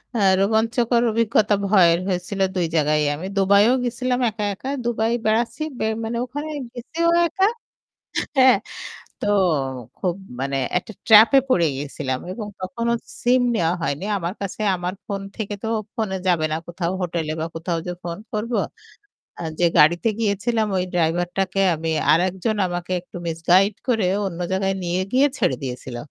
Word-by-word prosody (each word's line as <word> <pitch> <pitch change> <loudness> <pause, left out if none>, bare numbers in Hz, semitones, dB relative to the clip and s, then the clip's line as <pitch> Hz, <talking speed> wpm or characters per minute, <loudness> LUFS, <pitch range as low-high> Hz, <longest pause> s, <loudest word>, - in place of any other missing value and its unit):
আ - - 0 0.2
রোমাঞ্চকর 230 +3 +2
অভিজ্ঞতা 220 -1 +2
ভয়ের 175 -4 +5
হয়েছিল 185 +1 -3 0.2
২ 175 -2 +1
জায়গায়ই 150 -1 +2
আমি 165 - -7
দুবাইও 200 +4 +5
গেছিলাম, 250 +1 -1
একা, 210 0 -5
একা 260 +7 -7 0.2
দুবাই 225 -1 0
বেড়াচ্ছি। 230 +7 +1 0.2
বে - - 0 0.2
মানে 230 +1 -3
ওখানে 290 +5 -6 0.2
গেছিও 325 +8 -1 0.2
একা 385 +3 +1 0.9
হ্যাঁ। 260 0 +7 0.6
তো - - -2 0.7
খুব 180 -2 -1 0.2
মানে 135 +1 -2 0.2
একটা 220 - -5
ট্র্যাপ 220 0 +9
এ - - +9
পড়ে 170 -9 +3
গিয়েছিলাম 135 -2 -3
এবং 210 +2 -5
তখনো 235 +5 -2 0.3
সিম 250 +1 +4
নেওয়া 170 -3 +1
হয়নি। 165 +4 -2
আমার 170 0 -3
কাছে 200 +2 -4
আমার 180 +1 -3
ফোন 200 -1 -4
থেকে 210 -2 -4
তো - - -2 0.3
ফোনে 210 -4 -2
যাবে 165 -3 +3
না 155 - 0
কোথাও 175 0 -3
হোটেলে 165 -3 -2
বা - - -1
কোথাও 165 +1 -2
যে - - -2
ফোন 170 -1 -4 0.2
করব। 220 +3 -2 0.9
আ - - -5 0.2
যে 175 - +4
গাড়িতে 170 +8 +5
গিয়েছিলাম 220 +1 0
ওই 180 - +1
ড্রাইভারটাকে 175 +3 0 0.2
আমি 160 +1 -4 0.2
আরেকজন 185 +6 +1
আমাকে 175 0 -5
একটু 180 - -11
মিসগাইড 180 +5 +3
করে 225 -6 +2 0.2
অন্য 170 -2 -7
জায়গায় 195 0 0
নিয়ে 175 +1 -1
গিয়ে 270 +3 +4
ছেড়ে 130 - +1
দিয়েছিল। 125 -1 -5
195 Hz, 155 wpm, -22 LUFS, 170-225 Hz, 0.9 s, ট্র্যাপ